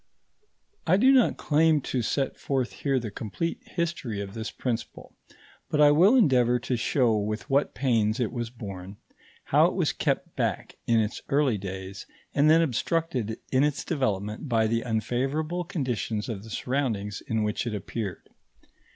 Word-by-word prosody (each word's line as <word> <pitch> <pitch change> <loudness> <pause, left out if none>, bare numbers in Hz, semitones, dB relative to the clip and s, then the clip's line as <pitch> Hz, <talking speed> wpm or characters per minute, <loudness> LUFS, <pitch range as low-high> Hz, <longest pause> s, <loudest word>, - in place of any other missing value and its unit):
I 185 - +5
do 255 +6 +6
not 260 -3 +4
claim 155 0 +3
to 130 -1 -2
set 135 +4 -1
forth 130 -3 -1
here 135 -2 0
the 115 -3 -5
complete 120 +11 -3
history 170 - -3
of 100 -1 -5
this 110 0 -4
principle, 120 -3 -5 0.5
but 150 - 0
I 145 -1 +7
will 185 - +6
endeavour 125 - +4
to 125 +1 -2
show 120 0 +2
with 105 +3 -2
what 140 +2 +2
pains 115 -3 +1
it 120 -4 0
was 120 -2 -3
born, 100 -4 -8 0.5
how - - +4
it - - -3
was - - +1
kept - - -1
back - - -2
in 115 -1 +4
its 110 0 -1
early 140 -7 +2
days 95 +1 -7 0.3
and 145 +2 +4
then 165 +1 +6
obstructed 130 -5 -1
in 130 +1 +3
its 150 -1 0
development 105 - -2
by 115 -2 +3
the 115 +1 +1
unfavourable 135 +9 -1
conditions 120 - -2
of 105 -3 -5
the 115 - -11
surroundings 110 -5 -2
in 110 -1 0
which 105 +3 -1
it 110 - -2
appeared. 100 0 -5
120 Hz, 165 wpm, -27 LUFS, 110-145 Hz, 0.5 s, I